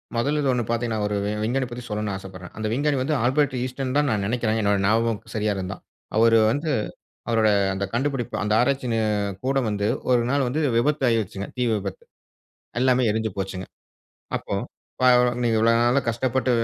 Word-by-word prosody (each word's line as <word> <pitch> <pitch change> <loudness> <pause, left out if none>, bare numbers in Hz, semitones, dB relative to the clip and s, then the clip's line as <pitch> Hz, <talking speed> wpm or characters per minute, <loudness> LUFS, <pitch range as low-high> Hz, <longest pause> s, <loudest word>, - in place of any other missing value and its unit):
முதல்ல 145 +6 +1
இது 140 - +1
1 120 -1 0
பாத்தீங்கன்னா, 115 -2 -1
ஒரு 105 - -2 0.3
விஞ்ஞானி 130 +3 0
பத்தி 120 0 -7
சொல்ல 105 -1 -2
ஆசப்படுறேன். 95 -2 -10
அந்த 110 0 -2
விஞ்ஞானி 145 +2 +1
வந்து 150 +4 0
ஆல்பர்ட் 135 +1 +2
இன்ஸ்டீன்தான்னு 135 +3 -1
நான் 100 -2 0
நெனைக்கிறேன் 115 -1 0
என்னோட 100 0 +2
ஞாபகம் 115 +1 +2
சரியா 105 -1 0
இருந்தா. 95 0 -4 0.4
அவரு 115 0 +5
வந்து, 150 +5 -1 0.6
அவரோட 110 -2 +3 0.3
அந்த 100 - -2
கண்டுபிடிப்பு, 135 -1 -1
அந்த 105 - 0
ஆராய்ச்சி 135 +1 +1
நி 115 - +1 0.5
கூடம் 135 -3 +1
வந்து 105 0 -1 0.2
1 125 -1 +4
நாள் 140 -2 +2
வந்து 150 +6 -1 0.2
விபத்தாயிருச்சுங்க, 115 -7 0
தீ 125 - -1
விபத்து. 470 - -5 0.8
எல்லாமே 130 -1 +3
எரிஞ்சு 110 -1 -1
போச்சுங்க. 95 -1 -4 0.7
அப்போ - - -9 0.5
பா 130 - +5 0.3
நீங்க 115 -2 +2
இவ்வளவு 115 +1 +4
நாளா 120 +3 +3
கஷ்டப்பட்ட 125 +2 0
120 Hz, 160 wpm, -24 LUFS, 110-130 Hz, 0.8 s, அவரு